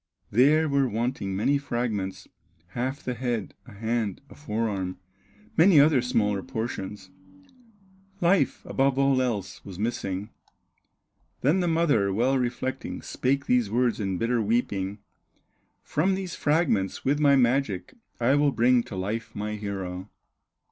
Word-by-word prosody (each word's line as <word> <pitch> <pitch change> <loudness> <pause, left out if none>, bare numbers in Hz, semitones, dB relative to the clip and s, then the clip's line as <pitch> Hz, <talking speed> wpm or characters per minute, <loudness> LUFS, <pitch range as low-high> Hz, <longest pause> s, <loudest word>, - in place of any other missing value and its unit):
There 150 +8 +4
were 140 -2 +2
wanting 110 -3 -2
many 140 +8 +2
fragments, 120 -8 -3 0.4
Half 130 +8 -3
the 125 - -2
head, 120 -4 -3
a - - -12
hand, 110 -1 -2
a - - -9
fore 115 -5 -2
arm, 95 -3 -3 0.6
Many 170 -1 +6
other 145 -3 +5
smaller 105 -5 +1
portions, 110 -6 -5 1.1
Life, 175 -7 +2
above 135 0 +1
all 135 -1 +3
else, 110 -7 -3
was 95 -3 -9
missing. 105 -2 -3 1.1
Then 150 +8 +3
the 180 - +1
mother, 155 -12 +2
well 125 +7 +2
reflecting, 125 +2 -3
Spake 140 +2 -1
these 125 -4 +2
words 120 +1 +1
in 95 -3 -1
bitter 115 +3 +1
weeping: 105 -3 -1 0.9
"From 185 +6 +1
these 190 -2 -5
fragments, 145 - 0
with 145 +2 +2
my 140 -2 +5
magic, 125 - +1 0.3
I 120 +3 +3
will 145 0 +3
bring 120 +1 +4
to 100 - -8
life 105 +5 -3
my 105 +1 -3
hero." 95 -2 -5
120 Hz, 135 wpm, -26 LUFS, 105-140 Hz, 1.1 s, Many